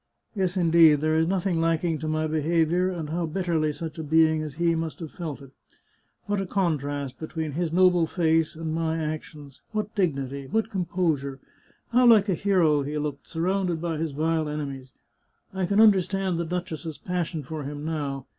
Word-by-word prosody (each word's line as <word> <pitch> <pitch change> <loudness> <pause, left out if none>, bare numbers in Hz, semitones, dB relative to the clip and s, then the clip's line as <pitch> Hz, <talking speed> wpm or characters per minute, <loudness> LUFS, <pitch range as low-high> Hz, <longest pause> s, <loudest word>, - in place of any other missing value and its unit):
Yes, 190 -2 0
indeed, 165 -3 +6
there 155 +2 0
is 160 +1 +2
nothing 185 -2 0
lacking 165 -1 +1
to 155 - -4
my 155 0 0
behaviour, 165 +3 +1
and 165 -5 -5
how 170 0 -1
bitterly 160 -2 0
such 160 +1 -7
a - - -3
being 160 +1 +3
as 150 -3 -6
he 170 +1 +2
must 160 -1 -3
have 160 -3 -7
felt 155 -6 -6
it! 135 - -14 0.7
What 205 -1 -1
a 195 - -4
contrast 145 -8 -2
between 160 -1 -4
his 165 +2 -2
noble 180 -1 +4
face 160 -2 +1
and 160 0 -4
my 160 0 -1
actions! 150 -3 -6
what 215 0 -2
dignity! 140 - -1
what 225 +6 -1
composure! 165 -7 -1 0.5
How 245 +1 +5
like 215 -3 +6
a - - +3
hero 170 -5 +2
he 145 +2 -3
looked, 150 -2 -4
surrounded 180 0 0
by 165 -1 -2
his 160 0 -2
vile 160 +1 0
enemies! 140 -3 -5 0.6
I 190 -2 -1
can 200 +2 +2
understand 195 -4 +3
the 170 - -1
duchess's 165 -2 -4
passion 170 -3 -3
for 155 +3 -6
him 145 +1 -6
now. 145 -4 -3
160 Hz, 180 wpm, -26 LUFS, 150-180 Hz, 0.7 s, indeed